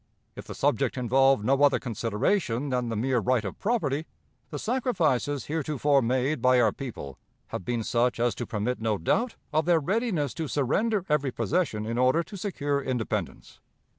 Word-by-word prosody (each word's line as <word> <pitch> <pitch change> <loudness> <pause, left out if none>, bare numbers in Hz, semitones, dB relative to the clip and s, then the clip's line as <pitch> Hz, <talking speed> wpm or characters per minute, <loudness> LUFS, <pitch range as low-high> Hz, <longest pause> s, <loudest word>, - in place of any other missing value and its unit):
If - - -9
the - - -7
subject - - 0
involved 130 -2 +3
no 135 +3 +2
other 145 -1 +5
consideration 120 - -1
than 125 -2 -1
the 115 - -2
mere 125 +3 +1
right 120 0 +1
of 95 - -6
property, 160 - -1 0.4
the 150 - -5
sacrifices 165 - 0
heretofore 145 -2 +1
made 130 +3 0
by 130 0 +4
our 115 -3 +4
people 100 - -8 0.3
have - - -5
been 120 +3 -2
such 120 +2 +1
as 120 0 +2
to 120 - -5
permit 115 +3 -2
no 110 -2 0
doubt 225 - 0 0.2
of 155 +1 +2
their 170 -1 +4
readiness 180 - -1
to 160 +2 -4
surrender 185 - 0
every 150 -3 +1
possession 115 - -1
in 115 +2 -2
order 130 +7 +3
to 205 - -11
secure 145 -8 -2
independence. 125 -4 -4
135 Hz, 170 wpm, -27 LUFS, 120-155 Hz, 0.4 s, other